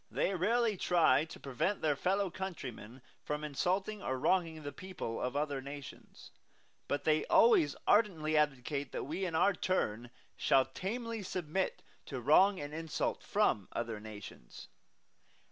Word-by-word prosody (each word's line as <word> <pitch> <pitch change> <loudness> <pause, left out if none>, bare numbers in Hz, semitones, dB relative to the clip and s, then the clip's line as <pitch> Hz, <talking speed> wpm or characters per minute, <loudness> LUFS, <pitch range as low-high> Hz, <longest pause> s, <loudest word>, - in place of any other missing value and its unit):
They 195 - 0
rarely 220 +3 +1
try 160 -6 +3
to 160 - -11
prevent 140 - -1
their 150 -2 +2
fellow 190 +5 0
countrymen 130 - -7 0.2
from 150 0 -3
insulting 185 +8 -1
or 130 -6 -2
wronging 160 +1 +1
the 145 - -5
people 145 -7 -6
of 125 +2 -2
other 145 -2 -1
nations; 140 +1 -10 0.6
but 145 - -1
they 155 0 +3
always 160 -11 +5
ardently 165 -8 +3
advocate 145 -1 0
that - - -3
we, 170 +7 -3
in 170 -3 -3
our 200 +5 +4
turn, 120 - -1 0.3
shall 135 -1 +3
tamely 225 - -4
submit 185 -1 -2 0.2
to 130 - -4
wrong 185 - +5
and 145 +1 -6
insult 160 0 -2
from 100 -3 +1
other 115 -2 -3
nations. 105 - -10
155 Hz, 145 wpm, -33 LUFS, 135-190 Hz, 0.6 s, always